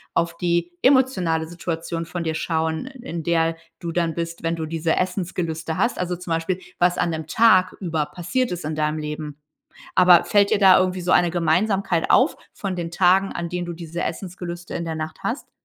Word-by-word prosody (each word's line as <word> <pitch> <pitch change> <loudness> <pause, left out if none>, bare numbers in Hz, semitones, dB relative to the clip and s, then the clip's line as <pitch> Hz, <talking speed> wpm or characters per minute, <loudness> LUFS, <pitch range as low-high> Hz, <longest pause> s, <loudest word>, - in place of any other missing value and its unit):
auf 170 0 +1
die 170 0 0
emotionale 220 - +3
Situation 165 0 -4
von 175 -1 -4
dir 160 - -1
schauen, 160 +6 -1
i 260 -2 -12
in 165 -1 -4
der 165 0 +1 0.2
du 170 -2 -4
dann 165 -1 0
bist, 170 0 -4
wenn 165 0 -1
du 160 -1 -4
diese 165 0 -1
Essensgelüste 175 -3 -2
hast. 235 +5 0
Also, 180 0 -1
zum 175 -1 -8
Beispiel, 165 +3 -1 0.2
was 175 0 +3
an 170 - +1
dem 160 -1 -4
Tag 185 -2 +4
über 160 -4 -1
passiert 180 +10 -2
ist 175 -3 -4
in 155 - -2
deinem 150 0 -1
Leben. 150 -1 -5 0.6
Aber, 180 -2 +7
fällt 200 -1 +3
dir - - +3
da 190 -2 +7
irgendwie 185 0 0
so 180 - -1
eine 175 -1 +4
Gemeinsamkeit 175 +1 +1
auf 260 +5 +4 0.2
von 195 -2 -4
den 170 -1 -4
Tagen, 185 +3 +3
an 170 0 -4
denen 175 0 -4
du 170 - -4
diese 170 0 -5
Essensgelüste 175 0 -6
in 170 - -3
der 160 -1 -3
Nacht 155 0 -5
hast? 245 +5 -3
170 Hz, 200 wpm, -23 LUFS, 165-185 Hz, 0.6 s, Aber